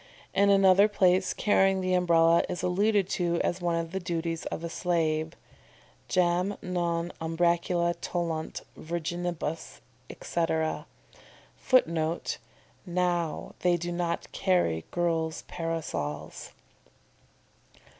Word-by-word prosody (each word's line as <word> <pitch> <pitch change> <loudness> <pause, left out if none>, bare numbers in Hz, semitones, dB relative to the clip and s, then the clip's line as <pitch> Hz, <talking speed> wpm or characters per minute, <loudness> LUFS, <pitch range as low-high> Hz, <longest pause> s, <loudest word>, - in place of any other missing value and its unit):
In 200 +1 +4
another 195 0 +6
place 185 -2 +3
carrying 195 -2 +3
the 185 0 0
Umbrella 170 -2 +4
is 180 - -4
alluded 200 +2 +2
to 170 -3 0
as 175 +1 -1
one 175 -1 0
of 165 0 -3
the 190 - -2
duties 165 -2 -3
of 165 - -5
a - - -2
slave: 160 -2 0 0.7
"Jam 180 +2 +1
non 175 -1 -2
umbracula 170 +1 +1
tollunt 170 -2 -3
Virginibus," 170 -1 -4 0.3
etc. 160 -2 -2 0.7
[Footnote: 165 -9 +1 0.4
"Now 175 -3 -1
they 175 -1 +2
do 175 +1 -4
not 175 -1 -2
carry 175 - +1
girls' 165 -2 -1
parasols." 165 - -4
175 Hz, 105 wpm, -28 LUFS, 165-180 Hz, 0.7 s, another